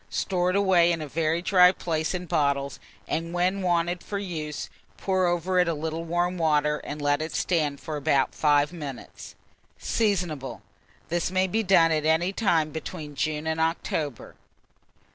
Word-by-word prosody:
Store 180 -2 0
it 185 - 0
away 185 -4 +4
in 165 - -1
a 155 - -5
very 165 +3 -1
dry 180 -2 +6
place 160 -2 -2
in 180 0 -4
bottles, 140 -4 0 0.3
and 165 +2 -3
when 185 +3 +1
wanted 175 -1 0
for 205 - -5
use, 160 -6 -5 0.3
pour 185 -2 +1
over 175 +1 +1
it 180 - +3
a 165 - 0
little 160 +2 -4
warm 175 +2 -1
water, 150 -2 +2
and 150 - -7
let 145 0 +1
it 160 +1 -4
stand 150 -5 0
for 155 -1 -5
about 140 -2 +1
5 145 +1 +2
minutes. 145 -7 -8 0.4
Seasonable. 175 - -1 0.5
This 170 0 0
may 185 +1 +2
be 215 +4 0
done 180 -5 +4
at 155 -1 +1
any 170 +4 +2
time 165 -8 +1
between 160 -1 -7
June 150 +1 -2
and 160 0 -1
October. 160 -4 -2
165 Hz, 165 wpm, -26 LUFS, 150-180 Hz, 0.5 s, dry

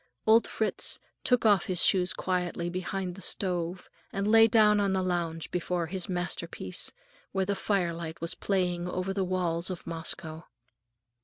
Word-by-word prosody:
Old 225 +1 +5
Fritz 220 - 0 0.3
took 250 -2 +2
off 205 -4 +5
his 180 -2 +2
shoes 185 -1 +4
quietly 175 -2 -2
behind 185 0 -3
the 195 - -11
stove 180 -2 -1 0.2
and 200 +1 -1
lay 225 +1 +7
down 210 -2 +5
on 200 -1 +2
the 190 -1 +1
lounge 170 -3 -2
before 180 -1 -1
his 185 +2 -3
masterpiece, 175 -1 -3 0.4
where 190 -1 +1
the 200 - 0
firelight 170 -5 -1
was 170 0 -2
playing 180 -3 -1
over 185 +1 -2
the 195 -1 0
walls 180 -2 -1
of 180 -2 -6
Moscow. 165 0 -4
185 Hz, 155 wpm, -29 LUFS, 175-195 Hz, 0.4 s, lay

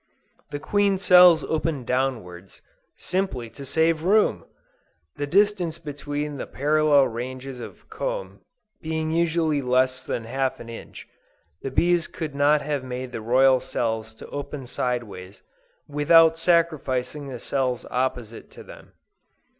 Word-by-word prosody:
The 145 - -4
queen 200 +5 +1
cells 180 -3 +7
open 155 -4 -2
downwards, 110 -9 -3 0.3
simply 175 -12 -3
to 140 - -10
save 160 +2 +2
room! 205 +5 +2 0.7
The 145 0 -3
distance 185 -2 +2
between 145 -2 -5
the - - -6
parallel 145 -1 +3
ranges 130 +2 -6
of - - -11
comb - - -5 0.4
being 160 0 -2
usually 160 -3 +1
less 130 0 +1
than 115 - -3
half 130 +3 -2
an 115 - -10
inch, 115 - -10 0.5
the 135 - -4
bees 175 +5 +2
could 160 -4 -6
not 145 +1 +3
have 145 -2 -2
made 130 0 -6
the 115 - -5
royal 130 +3 +4
cells 110 -3 -3
to - - -11
open 145 -1 -6
sideways, 110 -7 -4 0.4
without 160 +3 +5
sacrificing 155 -5 0
the 130 -2 -6
cells 130 -2 -2
opposite 125 -3 -3
to - - -13
them. - - -14
140 Hz, 130 wpm, -24 LUFS, 125-160 Hz, 0.7 s, cells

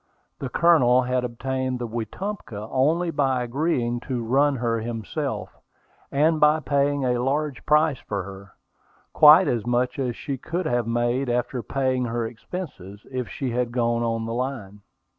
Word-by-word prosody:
The 135 - -4
Colonel 130 -6 +4
had 125 0 0
obtained 130 +2 -2
the 120 -1 -4
Wetumpka 115 - -5
only 160 +6 +2
by 135 -4 +1
agreeing 120 -2 -1
to 125 -3 -2
run 135 +5 +2
her 115 -2 -1
himself, 110 -3 -4 0.6
and 155 +3 +2
by 150 +1 +5
paying 140 -1 +1
a 125 -1 +1
large 140 +2 -1
price 150 -2 +3
for 100 -2 -4
her, 95 0 -11 0.6
quite - - +8
as 115 -3 0
much 125 +2 0
as 125 -3 -1
she 135 0 -5
could 175 +6 -3
have 120 -5 0
made 120 +3 0
after 125 +1 -1
paying 130 +2 -1
her 115 0 -2
expenses, 110 - -8
if 130 -2 -3
she 130 -3 -3
had 120 0 -1
gone 120 -1 0
on 115 -1 -1
the 115 - -4
line. 120 -6 -4
125 Hz, 160 wpm, -24 LUFS, 115-140 Hz, 0.6 s, quite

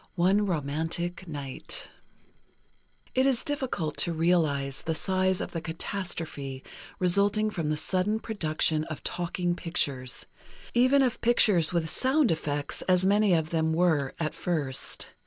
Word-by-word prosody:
XIII - - -30
"ONE 195 +4 +3
ROMANTIC 165 +3 -3
NIGHT" 140 -4 -5 1.2
It 260 +1 +3
is 260 -3 +1
difficult 255 - -2
to 170 - +1
realize 155 -5 +1
the 160 - -2
size 185 +2 +1
of - - -5
the 165 - -4
catastrophe 160 -6 -4 0.3
resulting 200 +4 +2
from 165 -6 -2
the 155 - 0
sudden 185 +6 0
production 160 -7 0
of 155 -2 -7
talking 175 0 -1
pictures, 140 -8 -2 0.5
even 255 +3 +4
of 250 -3 -1
pictures 210 -8 +4
with 170 -2 0
"sound 260 - +3
effects," 145 -2 -2
as 180 0 +4
many 205 -1 +4
of 160 -1 -1
them 160 -1 +1
were, 160 -5 +1
at 155 -2 -2
first. 145 -7 -1
170 Hz, 140 wpm, -28 LUFS, 155-200 Hz, 1.2 s, even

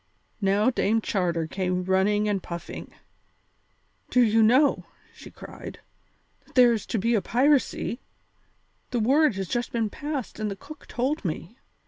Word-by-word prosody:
Now 205 +5 +3
Dame 225 -2 +1
Charter 175 -6 -1
came 180 +2 -2
running 195 +3 +2
and 200 -2 0
puffing. 170 0 -7 1.2
"Do 250 - +2
you 225 -1 +4
know," 255 +7 +4 0.3
she - - -12
cried, - - -10 0.7
"that - - -24
there 245 -2 +7
is 220 - -4
to 230 - -1
be 230 +4 +1
a 215 - +2
piracy? 255 +1 +1 0.9
The 245 - -1
word 270 +2 +3
has 195 -1 -3
just 240 +5 -2
been 225 -3 -1
passed 290 -7 -5
and 215 -1 -1
the 200 - -4
cook 285 +7 -13
told 265 +5 -2
me. 175 +4 -4
220 Hz, 150 wpm, -26 LUFS, 195-250 Hz, 1.2 s, there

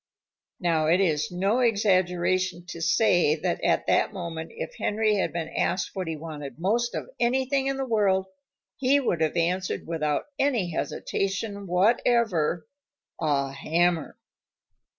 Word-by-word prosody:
Now, 165 -4 +1
it 170 +3 +4
is 155 -6 +1
no 195 +7 +1
exaggeration 185 -5 +1
to 170 -1 -7
say 175 -3 +3
that 175 +2 -2
at - - +2
that - - +2
moment 170 -4 -6
if - - -5
Henry 215 0 +1
had 190 - 0
been 165 -2 -4
asked 180 +1 -1
what 185 -3 -4
he 160 - -2
wanted 150 -4 -8
most 225 +8 0
of - - -5
anything 265 +3 +1
in 275 0 -1
the 270 - -2
world 200 -5 +2 0.5
he 275 +2 +3
would 180 - -1
have 160 +2 +1
answered 180 +2 -1
without 150 -3 -1 0.2
any 240 -11 +1
hesitation 195 +4 -3
whatever, 185 -3 +2 0.5
"A 140 -3 0
hammer." 165 +3 0
180 Hz, 140 wpm, -26 LUFS, 165-215 Hz, 0.5 s, it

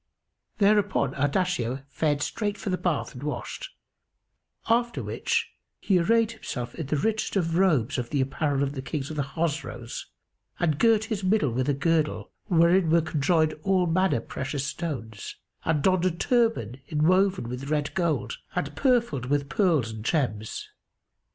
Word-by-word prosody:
Thereupon 205 -9 +3
Ardashir 140 -3 0
fared 145 0 0
straight 205 -2 -2
for 200 -1 -3
the 185 - +1
bath 175 -5 -1
and 125 - -9
washed; 325 - -5 1.0
after 235 +1 +1
which - - -1 0.3
he 190 -3 +2
arrayed 230 +5 +3
himself 125 - -6
in 160 -5 -5
the 150 - 0
richest 220 +9 -1
of 165 -4 +1
robes 150 -8 +2
of 120 -1 -4
the 145 - 0
apparel 140 +1 0
of 140 - -1
the 135 - -4
Kings 140 +2 -4
of - - -5
the 150 - 0
Chosroës 140 -5 -3 0.5
and 155 -4 +1
girt 225 0 +4
his 220 -3 -3
middle 185 - +2
with 130 +4 -1
a 145 - +2
girdle 155 +1 0
wherein 170 -1 +4
were 165 +1 +5
conjoined 155 +1 +2
all 185 +1 +2
manner 175 -6 +2
precious 135 +3 -4
stones 115 - -5 0.3
and 155 -3 +1
donned 185 -1 +3
a - - +4
turband 185 - +1
inwoven 185 0 +2
with 125 +3 -5
red 150 -1 0
gold 175 - -1 0.2
and - - -2
purfled 235 - +1
with 140 0 0
pearls 165 - +2
and 110 -1 -7
gems. 110 -7 -1
155 Hz, 155 wpm, -26 LUFS, 140-190 Hz, 1.0 s, were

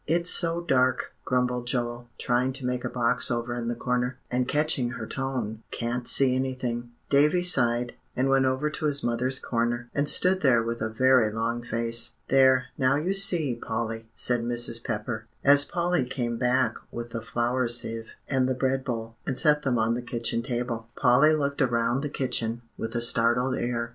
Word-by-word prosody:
"It's 170 +3 +2
so 170 0 +2
dark," 130 -6 +1
grumbled 125 -1 0
Joel, 120 -1 -2
trying 125 +2 0
to 135 -1 -6
make 125 0 -2
a 125 - -2
box 125 0 +1
over 120 0 -2
in 120 -1 -4
the 120 - -1
corner, 125 +1 -1
and 125 0 0
catching 150 -4 +1
her - - -6
tone, 125 -5 -4
"can't 120 +1 -3
see 135 -2 +3
anything." 130 -2 -3 0.2
Davie 150 +5 +4
sighed, 120 -8 +3 0.2
and 130 +2 +1
went 135 0 +3
over 130 +4 0
to 155 - -4
his 145 -1 +1
mother's 125 +2 0
corner, 120 0 -2
and 145 +1 0
stood 185 +1 +3
there 120 -5 +4
with 115 0 -4
a 110 - -1
very 125 -1 +3
long 115 +2 -2
face. 115 0 -2
"There, 130 -1 +5
now 130 +1 +3
you 165 +6 0
see, 175 -8 +5
Polly," 115 -1 -4
said 120 -1 +1
Mrs. 120 -1 -2
Pepper, 110 +1 -4 0.2
as 140 +1 +6
Polly 175 -3 0
came 120 -2 -3
back 125 -2 +2 0.2
with 120 0 -7
the 115 - -4
flour 120 +2 -1
sieve 115 -1 -3
and 130 -2 +1
the 130 - 0
bread 130 +1 0
bowl, 115 -3 -5
and 130 - -2
set 150 0 +3
them 130 -4 0
on 110 +1 +1
the 120 - -3
kitchen 115 -1 -2
table. 120 -2 -4
Polly 140 +6 +4
looked 140 -1 -1
around 120 0 +1
the 145 - -3
kitchen 120 -4 -2
with 115 +1 -5
a 120 - 0
startled 120 +2 +2
air. 120 -1 -2
125 Hz, 185 wpm, -26 LUFS, 120-135 Hz, 0.2 s, as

